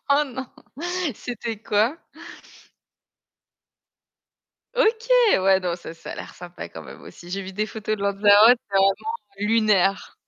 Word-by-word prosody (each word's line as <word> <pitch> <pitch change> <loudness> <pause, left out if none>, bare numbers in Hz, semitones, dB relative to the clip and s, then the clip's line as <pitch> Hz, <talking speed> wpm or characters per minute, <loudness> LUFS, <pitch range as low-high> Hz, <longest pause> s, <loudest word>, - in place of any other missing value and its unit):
Oh, 285 +1 +5
non! 260 -1 -7 0.7
C'était 230 -2 -6
quoi? 225 +9 0 2.7
OK! 465 -1 +1 0.3
Ouais 190 0 +4
donc 175 -1 -2
ça 165 - -9
ça 165 - -9
a - - -7
l'air - - -9
sympa 175 0 -9
quand - - -10
même - - -12
aussi. 175 - -13
J'ai 195 +2 -4
vu 190 0 -8
des 215 +3 -2
photos 215 0 -4
de 200 - -7
Lanzarote 205 +4 +5
c'est 195 - -1
vraiment 195 0 +4 0.4
lunaire. 210 -3 +1
205 Hz, 140 wpm, -23 LUFS, 195-230 Hz, 2.7 s, Oh